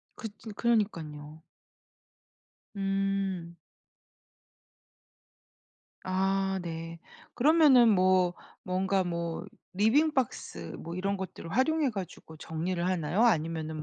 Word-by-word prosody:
그 225 - -6
진 220 +1 -9
그러니깐요. 160 -10 -1 1.3
음. 195 -3 -1 2.5
아 190 +1 0
네. 165 0 -6 0.4
그러면은 280 -3 +6
뭐 185 -3 +3 0.3
뭔가 190 +1 0
뭐 170 -1 -3 0.3
리빙 240 +11 +3
박스 85 - -3
뭐 170 - -7
이런 195 +2 -1
것들을 185 -3 -7
활용해 285 - +2
가지고 185 -5 -8
정리를 170 +3 -3
하나요? 185 +2 0
아니면은 160 -6 0
185 Hz, 190 characters per minute, -29 LUFS, 165-210 Hz, 2.5 s, 그러면은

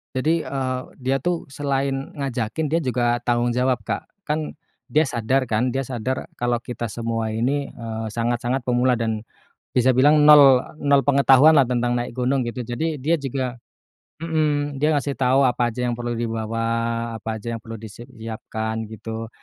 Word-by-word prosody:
Jadi, 160 +6 +2
eee, 130 -2 -2 0.2
dia 135 +1 +2
tuh 175 +3 -1
selain 140 -1 -1 0.2
ngajakin, 135 +1 -2
dia 165 - +3
juga 120 -3 0
tanggung 120 0 +1
jawab 125 0 +1
Kak. - - -4 0.2
Kan 155 0 -3 0.3
dia 155 +1 +3
sadar 130 0 0
kan, 115 +1 0
dia 135 - -1
sadar 130 0 -4
kalau 120 -1 +1
kita 120 -1 -4
semua 115 0 -3
ini, 135 +5 0
eee, 110 -1 -6
sangat-sangat 120 +3 -1
pemula 125 +1 +2
dan 110 -2 -1 0.5
bisa 130 +1 +3
bilang 150 +3 +5
nol 140 -4 +9 0.2
nol 140 -2 +3
pengetahuan 140 +2 +6
lah 140 - +7
tentang 120 -1 0
naik 120 0 -2
gunung 130 +1 +1
gitu, 120 +1 -4
jadi 150 +7 -2
dia 150 +5 +1
juga 130 -2 -3 0.7
mhm, 145 -3 0
dia 150 - +3
ngasih 140 -1 0
tahu 135 +1 +3
apa 120 -1 +1
aja 125 +2 -3
yang 120 - 0
perlu 120 0 -3
dibawa, 115 -1 -2 0.5
apa 110 0 -4
aja 115 +2 -5
yang 115 - -7
perlu 115 0 -8
disiapkan 110 -1 -6
gitu, 110 +1 -6
125 Hz, 165 wpm, -22 LUFS, 115-140 Hz, 0.7 s, nol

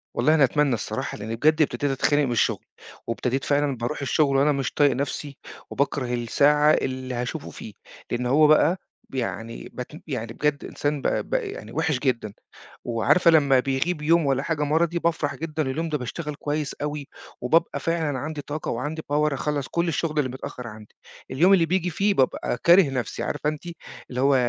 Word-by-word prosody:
والله 155 - +3
أنا 150 - +5
أتمنَّى 140 +1 +2
الصراحة، 110 - -3
لإني 110 +2 -4
بجد 155 +6 +3
ابتدِيت 145 -1 +1
أتخنَّق 145 +2 +2
من 125 - -2
الشغل، 120 - 0 0.4
وابتدِيت 125 +3 -1
فعلًا 140 -1 +1
بارُوح 120 +6 -3
الشغل 140 +1 +2
وأنا 145 +2 +4
مش 135 -3 -1
طايِق 145 -2 +4
نفسي، 140 +2 -4 0.3
وباكرَه 135 -3 -1
الساعة 145 +5 +3
اللي 130 -2 -2
هاشوفه 125 +5 -4
فيه. 105 - -10 0.4
لإن 120 +1 -1
هو 150 +5 +5
بقى 155 +4 +4 0.3
بيعني 115 -3 -4
بتم 140 +5 -7
يعني 115 -6 -4
بجد 150 +3 -1
إنسان 145 -1 -2
ب - - 0 0.2
بقى 485 -5 -1
يعني 455 +5 -8
وحِش 145 -6 0
جدًا. 115 -6 -1 0.5
وعارفة 120 +9 +3
لمَّا 140 -5 +5
بيغيب 135 +6 -1
يوم 165 +1 +3
والّا 135 -1 +1
حاجة 155 -2 -1
مَرضي، 165 +3 +1
بافرح 165 -4 0
جدًا، 155 -1 -3
اليوم 165 +4 -2
ده 150 - 0
باشتغَل 150 +4 -5
كويِس 145 0 -3
أوي، 150 -1 -3 0.3
وبابقى 160 +7 +2
فعلًا 160 -5 -1
عندي 155 +2 -4
طاقة 150 +2 -4
وعندي 150 +7 -3
power، 150 0 +2
أخلَّص 145 0 -2
كل 170 0 -1
الشغل 160 -1 -1
اللي 135 -3 +1
متأخّر 130 -1 -7
عندي. 105 -1 -12 0.4
اليوم 180 +8 +5
اللي 175 -4 +5
بييجي 180 +1 0
فيه 200 +5 +1
بابقى 130 -4 0
كاره 175 -2 +6
نفسي. 125 -4 -3
عارفة 150 0 -1
أنتِ، 155 -1 -6 0.5
اللي 125 0 -3
هو: 140 0 +4
145 Hz, 180 wpm, -24 LUFS, 130-155 Hz, 0.5 s, كاره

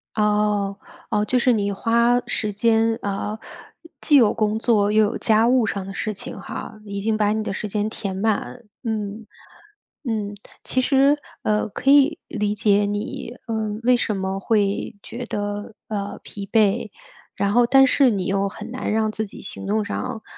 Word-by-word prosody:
哦， 210 -2 +1 0.3
哦， 210 0 +2
就 250 +4 +1
是 245 0 +3
你 205 -2 0
花 235 +4 +3
时 215 -2 -2
间， 225 +2 +2
呃， 205 +2 -3 0.6
既 295 - +3
有 235 -6 +6
工 215 0 0
作 215 -3 +2
又 215 0 +5
有 210 - 0
家 220 0 +3
务 250 -2 +4
上 200 -2 -3
的 195 - -7
事 215 +2 -3
情 195 - -7
哈， 215 +2 -7
已 200 -1 -5
经 220 +1 0
把 210 -1 +2
你 220 0 -1
的 195 - -3
时 210 - -4
间 210 +1 -1
填 200 -3 -5
满。 220 +4 -1 0.2
嗯， 215 -1 -4 0.8
嗯， 205 -2 -2 0.3
其 255 - 0
实， 275 +2 +4 0.3
呃， 210 0 +1
可 265 +6 +1
以 290 +3 +5
理 210 -2 -1
解 205 -1 +3
你， 205 +3 -4
呃， 220 -2 -2
为 250 +1 +5
什 215 -4 -1
么 190 0 -2
会 205 +1 0
觉 245 +1 -6
得， 205 0 -4
呃， 205 -2 -4
疲 200 -1 -8
惫， 220 0 +2 0.5
然 200 0 0
后 240 +1 +5
但 270 +2 +7
是 265 0 +4
你 195 -4 -1
又 195 0 0
很 215 +3 -9
难 255 - -3
让 220 0 +1
自 220 0 -3
己 - - -11
行 195 - -7
动 210 +1 +1
上 250 +1 -4
215 Hz, 190 characters per minute, -22 LUFS, 205-230 Hz, 0.8 s, 但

